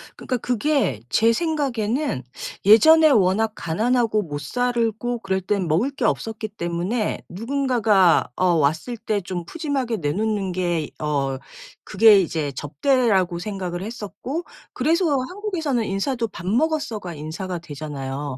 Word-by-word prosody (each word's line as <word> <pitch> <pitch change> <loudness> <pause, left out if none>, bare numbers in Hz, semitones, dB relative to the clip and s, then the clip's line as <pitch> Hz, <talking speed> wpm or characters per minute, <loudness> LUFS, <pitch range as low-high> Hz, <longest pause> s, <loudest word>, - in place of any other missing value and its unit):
그러니까 255 - -3
그게 245 - 0
제 225 +1 +4
생각에는 270 - -1 0.4
예전에 315 +10 +7
워낙 215 -1 +3
가난하고 220 +5 +1
못 145 -3 -5
살고 240 - -1
그럴 190 -3 -1
땐 190 -1 -1
먹을 175 - +2
게 265 -4 -3
없었기 220 -1 -2
때문에 185 +4 -2
누군가가 225 - +2
어 185 - +1
왔을 160 - 0
때 210 -1 -2
좀 175 -1 -5
푸짐하게 275 - -2
내놓는 195 +5 -1
게 180 -1 -1 0.3
어 140 -3 -1 0.5
그게 210 0 +6
이제 155 -4 -2
접대라고 190 - +1
생각을 180 -2 -4
했었고 235 - -5 0.3
그래서 330 +7 +1 0.2
한국에서는 325 - -2
인사도 230 +5 -1
"밥 180 -4 -10
먹었어?"가 235 - -1
인사가 165 +5 -5
되잖아요. 145 -3 -6
215 Hz, 295 characters per minute, -22 LUFS, 175-245 Hz, 0.5 s, 예전에